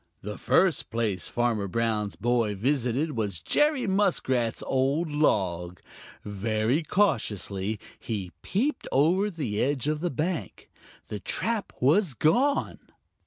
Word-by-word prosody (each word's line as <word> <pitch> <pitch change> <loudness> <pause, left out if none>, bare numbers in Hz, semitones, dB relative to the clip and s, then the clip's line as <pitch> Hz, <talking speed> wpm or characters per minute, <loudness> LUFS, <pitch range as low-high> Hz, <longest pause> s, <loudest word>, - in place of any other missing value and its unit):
The 105 +1 -6
first 185 -6 +2
place 110 -5 -1
Farmer 115 -4 0
Brown's 105 0 -1
boy 115 -3 +1
visited 130 +6 0
was 105 - -2
Jerry 295 - +2
Muskrat's 175 - +1
old 140 +5 +1
log. 90 - 0 0.5
Very 110 - 0
cautiously 110 - 0 0.2
he 100 -6 -4
peeped 250 +9 -1
over 175 +9 +3
the 135 - -2
edge 140 0 0
of 155 0 0
the 175 +2 -1
bank. 160 +4 -4 0.4
The 105 - -4
trap 220 - -2
was 150 - +3
gone! 255 - +2
125 Hz, 120 wpm, -27 LUFS, 105-165 Hz, 0.5 s, over